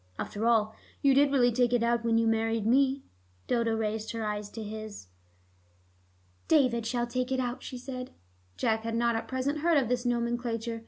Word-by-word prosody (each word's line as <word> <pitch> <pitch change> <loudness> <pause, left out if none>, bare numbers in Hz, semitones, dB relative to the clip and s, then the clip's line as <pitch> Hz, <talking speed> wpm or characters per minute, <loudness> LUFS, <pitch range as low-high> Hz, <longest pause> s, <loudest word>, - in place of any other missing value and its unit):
After 215 +3 -2
all, 220 -2 +3 0.3
you 275 -1 +5
did 280 +1 +4
really 245 -3 +4
take 245 +1 +2
it 240 -1 +2
out 235 0 +1
when 230 -1 +2
you 230 - +3
married 225 -1 +1
me." 265 +3 +3 0.4
Dodo 230 -2 +1
raised 220 0 -2
her 225 -1 -3
eyes 210 -1 -3
to 225 +1 -7
his. 215 - -8 1.4
"David 250 -7 +3
shall 240 0 0
take 250 +2 -3
it 260 - +1
out," 245 -1 -2
she 255 - -7
said. 255 0 -6 0.5
Jack 220 0 +1
had 225 0 -3
not 235 0 +2
at 225 - -3
present 265 +3 -1
heard 330 +1 +3
of 255 -5 +1
this 245 -1 0
nomenclature. 235 -1 -1
235 Hz, 190 wpm, -29 LUFS, 225-255 Hz, 1.4 s, you